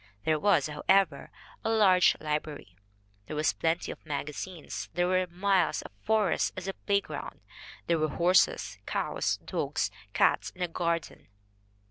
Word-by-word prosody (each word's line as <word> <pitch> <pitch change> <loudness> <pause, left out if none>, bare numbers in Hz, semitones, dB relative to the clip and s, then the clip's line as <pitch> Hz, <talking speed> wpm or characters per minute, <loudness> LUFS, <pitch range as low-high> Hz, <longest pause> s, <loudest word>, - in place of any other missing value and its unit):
There 155 -1 +2
was, 200 +6 +3
however, 155 +1 +1 0.3
a - - 0
large 195 -5 +5
library, 150 -9 -4 0.5
there 155 - -5
were 150 - -1 0.2
plenty 165 +1 0
of - - -11
magazines, 150 +3 -5
there 175 0 +2
were 185 0 +2
miles 185 +1 +1
of - - -10
forest 220 - +1
as 185 0 -5
a 195 - -2
play 200 0 0
ground, - - -8 0.4
there 170 -1 +1
were 155 0 +1
horses, 185 - +2
cows, - - -1
dogs, - - -1 0.2
cats, - - +2
a 180 -1 -2
garden. 170 0 -3
175 Hz, 140 wpm, -29 LUFS, 155-190 Hz, 0.5 s, large